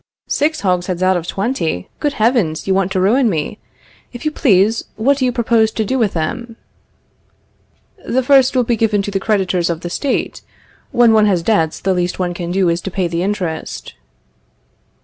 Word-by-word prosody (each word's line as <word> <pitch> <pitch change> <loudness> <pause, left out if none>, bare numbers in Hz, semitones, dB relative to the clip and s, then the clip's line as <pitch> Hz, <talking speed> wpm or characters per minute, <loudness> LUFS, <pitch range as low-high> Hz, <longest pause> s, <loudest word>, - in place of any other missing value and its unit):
Six 310 +2 0
hogsheads 180 -1 -1
out 185 0 +3
of 175 -1 -3
twenty! 195 - -2
Good 295 -1 -1
heavens! 215 - +1
You 195 - +1
want 190 0 0
to 185 - 0
ruin 230 +6 +3
me. 170 +4 -3 0.5
If 245 - -9
you 305 - +1
please, 220 - +2
what 275 +6 +1
do 260 - +1
you 250 - +1
propose 230 -2 +2
to 220 - -1
do 260 +5 -1
with 215 -4 +1
them? 230 +9 -4 1.5
The 260 +2 +1
first 270 0 +4
will 250 - +3
be 235 0 0
given 215 -2 +1
to 205 - -4
the 195 - -1
creditors 190 -4 0
of 170 -1 -3
the 175 - -6
State. 275 +8 -2 0.5
When 235 -2 +4
one 215 -1 +4
has 180 -4 +1
debts, 165 -8 +1
the 190 0 0
least 180 -1 -1
one 180 -1 -2
can 175 -1 -5
do 185 +1 +1
is 170 +1 0
to 195 - -5
pay 185 -1 -1
the 170 0 -2
interest. 180 -5 -4
200 Hz, 190 wpm, -17 LUFS, 180-235 Hz, 1.5 s, first